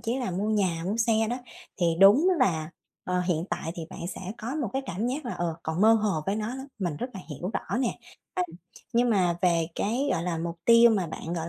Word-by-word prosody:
chí 235 +2 -1
là 245 -6 -2
mua 195 +4 -1
nhà 190 -6 +1
mua 200 +4 -1
xe 230 0 +2 0.2
đó 245 - -1 0.4
thì 175 - +1
đúng 220 - +7
là, 160 - +1 0.3
ờ, 180 0 0
hiện 175 -2 0
tại 165 - -3
thì 170 - -6
bạn - - -9
sẽ - - -8 0.2
có 240 +5 -4
một 305 - -1
cái 270 +1 -1
cảm 195 +5 -2
giác 270 +4 -2
là, 240 - -3
ờ, 170 -2 -2
còn 160 +2 -2
mơ 220 +2 +7
hồ 210 -7 +1
với 195 - 0
nó 215 0 -2
lắm, 265 +1 -7
mình 175 -7 -2
rất 250 - -4
là 190 - -6
hiểu 175 +6 -4
rõ - - -2
nè, 255 -3 -1 0.4
ừm. 360 - -2 0.4
Nhưng 240 +1 +3
mà 180 -5 +2
về 170 -3 +3
cái, 250 +7 0
gọi 165 - -1
là, 170 -2 -2
mục 170 +1 -4
tiêu 235 0 +7
mà 195 -5 +1
bạn, 165 +1 -6
gọi 165 -1 -3
200 Hz, 245 wpm, -27 LUFS, 170-235 Hz, 0.4 s, đúng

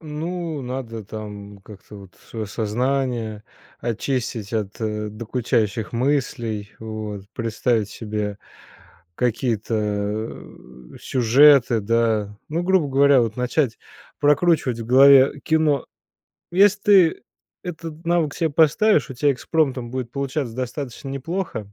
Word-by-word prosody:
Ну, 160 0 -4
надо 120 -4 -5
там 105 -1 -8
как-то 105 +1 -13
вот 95 -2 -14
свое 110 -2 -5
сознание 115 0 -2 0.4
очистить 115 -2 -3
от 105 -3 -2 0.4
докучающих 115 -1 -1
мыслей, 115 -5 -1
вот. 105 -3 -6
Представить 115 -2 -1
себе 105 -2 -4 0.8
какие-то, 115 -1 -1 1.2
э, - - -10
сюжеты, 125 -1 +5
да, 110 -1 0
ну, 165 +3 -1
грубо 185 -5 +2
говоря, 140 0 +5
вот 115 -1 -1
начать 125 0 0 0.4
прокручивать 145 -5 +2
в 115 - -6
голове 135 +2 +6
кино. 155 -4 +1 0.7
Если 200 +2 +4
ты 190 -6 +4 0.4
этот 165 -2 -8
навык 165 -4 +1
себе 165 -2 0
поставишь, 160 +4 +3
у 130 - -7
тебя 145 +3 +2
экспромтом 130 -3 -1
будет 125 -2 -4
получаться 140 -3 -3
достаточно 130 +1 -5
неплохо. 140 - -4
125 Hz, 110 wpm, -22 LUFS, 110-150 Hz, 1.2 s, голове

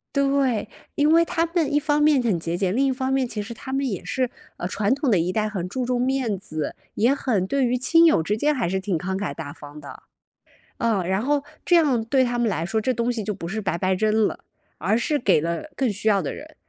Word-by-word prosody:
对， 275 -6 +1 0.2
因 295 +2 +2
为 335 +1 +5
他 330 0 0
们 330 -4 0
一 295 - +4
方 295 0 +1
面 295 -3 +4
很 210 -8 0
节 165 +1 -3
俭， 185 0 0
另 275 +2 +3
一 270 - +2
方 260 0 -2
面 265 -2 +1
其 210 -3 -4
实 215 +3 -8
他 265 +3 -7
们 275 0 0
也 185 -3 -5
是 250 +6 -1 0.3
呃， 175 - -3
传 205 +5 +1
统 280 -1 0
的 200 - +4
一 175 +2 0
代 215 -1 0
很 185 -4 -4
注 255 +6 -3
重 250 -1 0
面 255 -5 0
子， 155 -5 -5 0.2
也 235 +5 +3
很 210 -9 0
对 275 +1 +1
于 245 +1 +1
亲 330 +5 +5
友 310 - +5
之 205 +7 -1
间 300 +5 +2
还 240 -10 -1
是 190 +1 0
挺 190 -2 -2
慷 190 +3 -2
慨 205 - -3
大 145 -3 -7
方 145 0 -11
的， 140 - -11 0.8
嗯， 210 -6 +1
然 190 +2 +1
后 285 +2 +1 0.2
这 350 - +3
样 275 -9 +3
对 260 +3 +2
他 240 -1 -1
们 235 -2 +2
来 165 -3 -2
说 220 +4 -1
这 255 - +1
东 235 0 0
西 220 -3 -3
就 210 - -2
不 175 -4 -6
是 215 +4 -3
白 190 -3 -1
白 185 +1 +1
扔 215 +2 +2
了， - - -6 0.4
而 200 +7 +1
是 290 +5 0
给 195 -9 +3
了 170 - -3
更 260 -5 +1
需 210 +2 -2
要 200 -2 +4
的 155 - -3
人， - - -11
225 Hz, 275 characters per minute, -23 LUFS, 190-270 Hz, 0.8 s, 为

